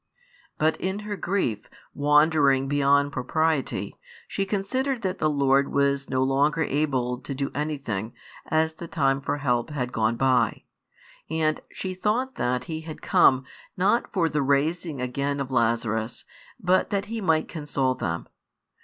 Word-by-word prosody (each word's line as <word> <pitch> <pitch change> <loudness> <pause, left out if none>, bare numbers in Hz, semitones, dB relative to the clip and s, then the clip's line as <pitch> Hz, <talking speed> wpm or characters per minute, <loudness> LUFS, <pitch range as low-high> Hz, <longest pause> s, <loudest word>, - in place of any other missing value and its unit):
But 155 +1 +2
in 190 +3 -3
her 210 0 -4
grief, 175 - -2 0.2
wandering 145 -2 +4
beyond 140 0 +3
propriety, 155 +2 -1 0.3
she 195 -1 -2
considered 250 +6 -1
that 185 -1 -2
the 155 - +2
Lord 140 -1 +2
was 140 0 +1
no 130 0 +1
longer 145 +4 +2
able 130 -4 0
to 135 +1 -6
do 140 0 -2
anything, 135 -8 -3 0.3
as 160 0 +1
the 170 +2 -8
time 135 -4 +1
for 145 - -2
help 125 -4 0
had 130 -5 -3
gone 110 0 +1
by; 130 0 +2 0.7
and 155 -1 0
she 185 -1 -4
thought 220 +8 0
that 125 - -1
|117 - - -12
He 160 -1 -5
had 160 -1 -9
come, 130 0 +4 0.3
not 200 +6 +2
for 175 -5 +2
the 150 -2 0
raising 145 +2 0
again 140 +3 -2
of 135 -1 -4
Lazarus, 115 -1 0 0.3
bat 185 0 +2
that 200 0 -1
He 225 +1 -4
might 160 -4 +2
console 145 -4 -1
them. 85 -8 -3
145 Hz, 155 wpm, -25 LUFS, 130-165 Hz, 0.7 s, wandering